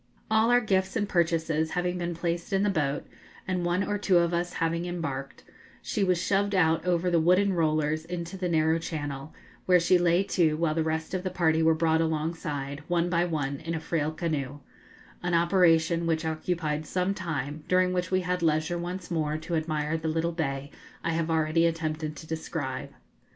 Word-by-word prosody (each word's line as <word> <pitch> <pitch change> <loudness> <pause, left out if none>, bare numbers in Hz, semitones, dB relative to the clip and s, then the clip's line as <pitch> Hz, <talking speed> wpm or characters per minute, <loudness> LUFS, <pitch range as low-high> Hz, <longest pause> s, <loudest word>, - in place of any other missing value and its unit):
All 220 +1 +4
our 245 0 +5
gifts 190 -3 0
and 205 -2 0
purchases 165 -3 +1
having 180 +1 -1
been 170 -1 -2
placed 170 +2 -3
in 195 0 +2
the 205 - +2
boat, 145 -5 -1 0.4
and 185 -1 -1
one 175 +2 +1
or 205 0 -2
two 190 -3 +3
of 170 0 +2
us 175 +1 -1
having 165 +1 -1
embarked, 140 -6 -5 0.4
she 210 - -1
was 180 -2 +2
shoved 200 +2 +1
out 160 -3 +3
over 180 0 +1
the 170 - +4
wooden 185 +4 +3
rollers 155 -2 +1
into 175 +1 -5
the 185 -1 -2
narrow 160 0 +2
channel, 145 -3 -5 0.4
where 180 -1 +6
she 180 +1 +4
lay 175 +2 +3
to 160 -6 +1
while 160 -1 +1
the 165 - 0
rest 160 +1 -2
of 185 - -1
the 185 - -2
party 165 -3 +2
were 160 0 +4
brought 160 0 +2
alongside, 155 -3 -2
one 175 0 +1
by 170 0 +2
one, 145 -5 -2
in 165 +1 -4
a - - -2
frail 155 -1 -1
canoe 145 -4 -3 0.6
an 175 -1 0
operation 170 -1 +3
which 160 0 0
occupied 155 -1 -2
some 185 +3 0
time, 150 -4 -4
during 185 0 +3
which 180 -1 -1
we 185 0 +2
had 180 0 -1
leisure 160 +2 +1
once 180 +1 -5
more 155 -2 0
to 160 +2 -6
admire 155 -1 -1
the 160 0 -4
little 165 +2 0
bay 140 -4 -3 0.3
I 165 - 0
have 165 0 -1
already 160 +1 +2
attempted 155 -2 -3
to 155 - -10
describe. 160 -4 -4
165 Hz, 195 wpm, -27 LUFS, 155-180 Hz, 0.6 s, where